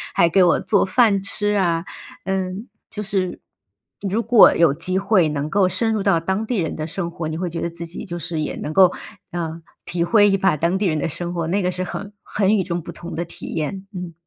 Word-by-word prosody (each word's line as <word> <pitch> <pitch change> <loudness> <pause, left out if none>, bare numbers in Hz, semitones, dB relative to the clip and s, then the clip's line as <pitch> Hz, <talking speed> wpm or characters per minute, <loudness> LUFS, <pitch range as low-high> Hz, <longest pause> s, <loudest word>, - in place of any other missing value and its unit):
还 170 - +5
给 190 +3 +3
我 175 - +4
做 205 - +2
饭 200 0 +3
吃 205 +1 +1
啊。 170 -3 +1 0.4
嗯， 190 +3 -3 0.2
就 210 - -5
是 190 -3 -2 0.7
如 220 +5 0
果 230 -2 +7
有 165 -4 +4
机 175 +5 -2
会 195 -4 +3
能 145 0 -2
够 195 -2 +3
深 225 +4 +1
入 215 - -1
到 170 - +3
当 190 +6 -2
地 245 - -1
人 165 -5 -1
的 155 0 -4
生 170 +1 -4
活， 170 -2 -5
你 155 0 -4
会 175 0 -3
觉 165 - -4
得 170 - -1
自 170 0 -7
己 170 - -6
就 175 -1 -5
是 170 0 -3
也 150 - -3
能 155 - -5
够， 185 0 +6 0.4
呃， 165 -1 -4 0.2
体 175 -1 -1
会 205 +3 +5
一 195 - +2
把 190 -5 +2
当 170 +5 +1
地 205 - -1
人 155 -3 0
的 - - -1
生 175 +2 -4
活， 170 -2 -2
那 195 +5 0
个 180 - 0
是 185 0 -3
很 200 +2 -6
很 205 0 +1
与 190 - +1
众 175 -1 -3
不 170 - -8
同 170 +1 -9
的 170 - -2
体 170 - -8
验。 180 +5 -4
嗯。 180 -2 -6
180 Hz, 255 characters per minute, -21 LUFS, 170-195 Hz, 0.7 s, 果